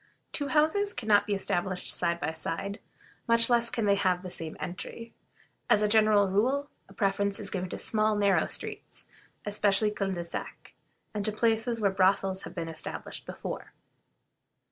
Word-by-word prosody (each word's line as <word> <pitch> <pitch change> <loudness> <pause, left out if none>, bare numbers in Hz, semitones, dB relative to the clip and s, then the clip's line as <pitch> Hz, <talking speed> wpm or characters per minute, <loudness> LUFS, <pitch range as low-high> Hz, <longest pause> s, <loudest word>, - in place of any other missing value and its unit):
Two 285 - -2
houses 315 +8 +2
can 220 - -6
not 205 -1 +5
be 205 - +1
established 185 -1 -1
side 170 -1 0
by 160 -1 -1
side, 165 +5 -4 0.5
much 230 +1 +5
less 235 -1 +3
can 230 -2 -1
they 200 - +4
have 185 -2 +1
the 185 - -6
same 160 -2 -6
entry. 230 +6 -7 0.6
As 210 - +4
a - - +4
general 215 -1 +4
rule, 260 +9 +1 0.2
a - - -14
preference 200 -1 +1
is - - -3
given 185 -1 -3
to - - -5
small, 215 -1 +2
narrow 200 -1 +3
streets, - - -4 0.4
especially 205 0 +2
culs 195 -2 -2
de 175 - -3
sac, 170 - -7 0.4
and 210 -1 -2
to 215 - +1
places 225 +1 +1
where 200 -2 +3
brothels 190 0 +2
have - - -10
been 165 -2 -3
established 160 -1 -6
before. - - -6
205 Hz, 170 wpm, -29 LUFS, 185-220 Hz, 0.6 s, not